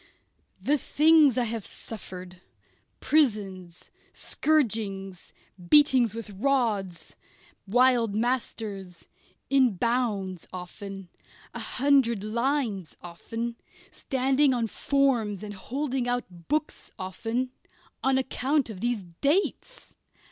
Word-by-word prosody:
The 295 +1 +1
things 305 -2 +5
I 250 - +3
have 225 -2 -3
suffered 185 -4 -9 0.6
prisons, 200 - 0 0.2
scourgings, 210 - -1 0.4
beating 265 -5 +6
with 230 -2 -7
rods, 200 - -1 0.5
wild 240 -1 +3
masters, 215 -6 -3 0.4
in 260 -6 +4
bounds 205 -5 -1
often, 190 +1 -8 0.4
a - - -5
hundred 255 -6 +2
lines 230 - -1
often, 225 +7 -6 0.3
standing 265 +1 +2
on 235 -2 0
forms 230 -5 0
and 205 -1 -6
holding 260 +4 -3
out 185 -9 -4
books 305 0 -2
often 225 +7 -3 0.5
on 265 0 +3
account 265 0 0
of 195 - -9
these 240 -4 -1
dates! 290 - -1
230 Hz, 95 wpm, -27 LUFS, 195-265 Hz, 0.6 s, beating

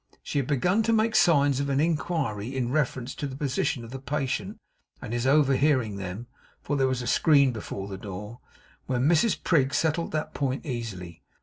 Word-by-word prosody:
She 145 - -1
had 135 - -2
begun 180 - +2
to 225 +1 +1
make 220 0 +2
signs 140 -5 +4
of 140 0 -1
inquiry 140 -6 -1
in 125 -2 -1
reference 130 -3 -1
to 145 - -4
the 130 - -7
position 135 -3 -1
of 115 - -11
the 135 - -6
patient 135 0 -3 0.4
and 110 - -6
his 120 +2 0
overhearing 135 -6 +3
them 95 +4 -6 0.3
for 145 - -3
there 135 -1 +2
was 130 -1 -1
a - - -5
screen 140 -1 +4
before 100 -3 -6
the 95 -1 -7
door 105 +4 -8 0.5
when 130 +1 +1
Mrs 175 +7 +2
Prig 140 -5 +2
settled 165 +1 0
that 155 -1 -2
point 135 +2 -2
easily. 110 - -6
135 Hz, 185 wpm, -26 LUFS, 120-150 Hz, 0.5 s, signs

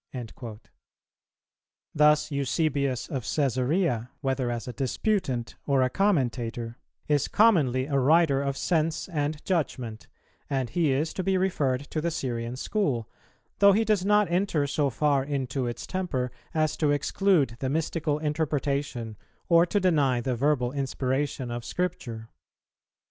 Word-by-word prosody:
"[287:3] 115 -2 -7 1.3
Thus 150 +1 +4
Eusebius 140 -2 0
of 135 -4 -3
Cæsarea, 130 - 0
whether 135 -3 -1
as 120 +1 -4
a 125 - -5
disputant 135 - -1
or 135 -2 +3
a 130 - 0
commentator, 120 - 0 0.3
is 145 -2 +2
commonly 145 - +3
a 140 -1 0
writer 145 0 +4
of 140 -1 -2
sense 160 -2 0
and 150 -2 -2
judgment; 130 - -2 0.4
and 135 -3 -1
he 165 -5 +2
is 150 +4 0
to - - -2
be 190 +1 +2
referred 145 -9 0
to 155 - -1
the 170 - 0
Syrian 120 -6 -3
school, 135 - -1 0.5
though 200 0 +7
he 220 +3 +2
does 210 -3 +2
not 210 0 +4
enter 175 -5 +1
so 140 0 0
far 140 +1 +1
into 135 -2 -2
its 120 0 -5
temper 150 -10 -2 0.2
as 155 -2 0
to 150 - +1
exclude 145 - +2
the 130 - -1
mystical 155 0 -1
interpretation 145 -6 -2 0.3
or 170 0 +5
to 205 - +1
deny 145 -9 +2
the 125 +1 -1
verbal 130 -1 +1
inspiration 135 -1 -2
of 120 0 -4
Scripture. 120 -9 -4
140 Hz, 140 wpm, -27 LUFS, 125-165 Hz, 1.3 s, though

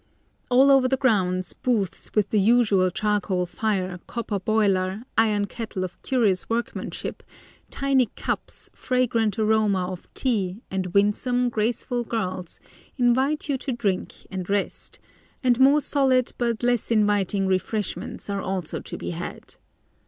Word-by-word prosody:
All 265 +3 +6
over 270 -2 +5
the 265 +1 +1
grounds 185 -8 +1
booths 205 -7 -2
with 205 -2 +2
the 215 - +3
usual 205 -3 +4
charcoal 195 -2 0
fire, 185 -2 -2
copper 230 -4 -3
boiler, 195 -1 +1
iron 210 -2 +3
kettle 215 -3 -5
of 185 - -7
curious 220 -9 +1
workmanship, 235 +1 -3 0.5
tiny 270 -3 +2
cups, - - -4
fragrant 235 -5 0
aroma 215 -4 +2
of 180 - -9
tea, 210 -5 -1
and 190 -1 -1
winsome, 245 +5 +2
graceful 240 +2 -1
girls, 185 -6 -4 0.4
invite 260 +5 +2
you 275 -3 0
to 270 - -3
drink 200 -6 -2
and 185 -1 -5
rest, 200 0 -2 0.5
and 245 -1 +3
more 275 +3 +6
solid 265 -4 +2
but 235 -1 -1
less 245 -2 +1
inviting 205 -3 +2
refreshments 190 +2 -2
are 200 -1 -2
also 185 -4 -3
to - - -7
be - - -5
had. 175 +1 -7
215 Hz, 135 wpm, -24 LUFS, 190-245 Hz, 0.5 s, All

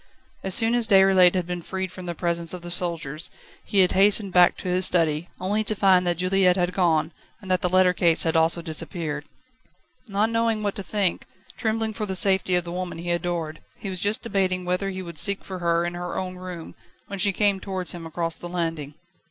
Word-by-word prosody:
As 190 -1 +2
soon 225 0 +3
as 240 -2 +2
Déroulède 190 -3 +5
had 180 -2 -1
been 175 0 -5
freed 190 +1 -5
from 185 -1 -10
the 170 - -4
presence 170 +1 -1
of 175 - -10
the 175 - -7
soldiers, 165 -3 -3 0.3
he 200 - +2
had 180 - +3
hastened 200 0 +4
back 180 -1 +5
to - - -7
his 180 +1 0
study, 165 -2 +1
only 205 +4 -1
to 215 - +5
find 185 -3 +3
that 175 -1 0
Juliette 185 0 +2
had 180 0 0
gone, 165 -4 +1 0.3
and 190 -4 -7
that 185 - +1
the 180 - 0
letter 185 0 +4
case 170 -2 +4
had 165 -1 -1
also 165 +1 +3
disappeared. 155 -2 -4 0.8
Not 210 +2 0
knowing 230 -2 0
what 205 -1 -1
to - - -4
think, 195 -3 -1 0.3
trembling 220 -1 -2
for 215 -1 -4
the 190 - -3
safety 190 -1 +4
of 180 - +1
the 170 - -7
woman 180 -1 -5
he 175 +1 -4
adored, 170 -3 -3
he 195 - -6
was 185 - -4
just 205 +4 -1
debating 190 -5 -1
whether 180 +2 -1
he 190 -1 -6
would 170 -3 -7
seek 200 +6 +1
for 185 -1 -7
her 170 0 +1
in 175 - -3
her 175 0 -5
own 185 -1 -4
room, 180 -2 -9 0.3
when 200 -1 -7
she 200 +2 +3
came 200 0 +1
towards 190 -2 -4
him 170 -2 -7
across 165 0 -4
the 175 - -7
landing. 165 -5 -4
180 Hz, 220 wpm, -24 LUFS, 170-195 Hz, 0.8 s, Déroulède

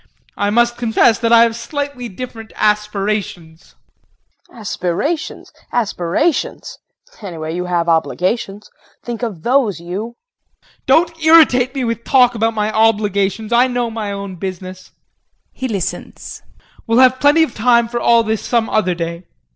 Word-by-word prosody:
I 205 - -1
must 240 +2 +2
confess 230 -2 +2
that 230 0 0
I 230 0 +7
have 230 -1 0
slightly 280 -1 -5
different 225 +2 -9
aspirations. 210 -5 -2 0.7
KRISTIN. - - -19
Aspirations? 210 - -3 0.2
Aspirations 225 - -1 0.4
anyway 165 -5 -6
you 180 0 -3
have 175 -1 -1
obligations. 185 +5 -1 0.3
Think 240 -1 -6
of 205 -9 -5
those, 240 - +1
you. 195 +7 -6
JEAN. - - -39 0.2
Don't 330 -1 +2
irritate 290 -5 +5
me 265 - -2
with 230 -1 -3
talk 250 -2 +4
about 225 0 -1
my 210 0 -1
obligations. 215 -1 +1
I 245 +2 +4
know 245 -2 -2
my 215 -2 -4
own 200 -2 -6
business. 185 0 -7 0.6
[He 260 - -5
listens.] 200 -7 -5 0.5
We'll 230 +1 +2
have 255 0 +5
plenty 290 +3 +4
of 260 - -3
time 235 +1 +3
for 240 +1 -3
all 235 -1 +4
this 220 -1 -2
some 230 -2 0
other 185 -5 +1
day. 170 +1 -5
225 Hz, 145 wpm, -17 LUFS, 195-245 Hz, 0.7 s, I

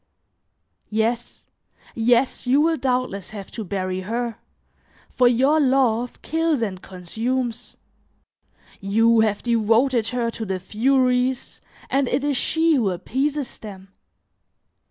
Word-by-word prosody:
Yes, 225 +2 -2 0.5
yes, 240 +3 +1
you 265 +3 +4
will 325 +1 +2
doubtless 250 - -2
have 200 -3 -9
to 225 - -5
bury 185 -1 -3
her, 230 +4 -3 0.7
for 250 - +3
your 265 +6 +3
love 255 -4 +1
kills 320 -5 0
and 185 -4 -4
consumes; 225 +7 -4 1.0
you 225 +3 +3
have 215 -2 +1
devoted 230 +1 +2
her 235 -1 -1
to 225 - -6
the 190 -3 -3
furies 250 +5 0 0.3
and 275 -1 +1
it 260 +3 0
is 290 -1 0
she 320 +5 +2
who 235 -9 +2
appeases 270 +9 -2
them. 195 -3 -10
235 Hz, 115 wpm, -22 LUFS, 215-260 Hz, 1.0 s, you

